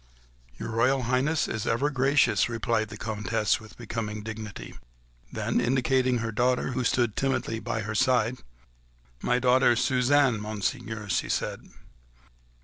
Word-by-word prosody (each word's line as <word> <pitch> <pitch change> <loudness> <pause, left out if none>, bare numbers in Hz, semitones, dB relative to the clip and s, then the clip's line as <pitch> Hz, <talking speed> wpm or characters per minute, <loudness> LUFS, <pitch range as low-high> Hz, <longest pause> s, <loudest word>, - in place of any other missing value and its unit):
"Your - - -5
Royal 125 +4 +2
Highness 130 +5 +1
is 110 +1 -3
ever 135 +6 +1
gracious," 135 0 +3
replied 115 -2 -1
the 105 - -8
Comtesse 110 0 -1
with 110 -1 -14
becoming 105 -2 -5
dignity. 110 - -7 0.6
Then, - - 0
indicating 130 0 +2
her 115 -1 -2
daughter, 125 +4 +1
who 130 0 -1
stood 120 -2 +1
timidly 130 -4 -1
by 115 0 -3
her 110 0 -4
side: 125 +1 +2 0.8
"My 125 - +2
daughter 125 -1 +4
Suzanne, 130 0 +3
Monseigneur," 110 +1 -4
she 95 - -1
said. - - -2
115 Hz, 135 wpm, -27 LUFS, 110-130 Hz, 0.8 s, daughter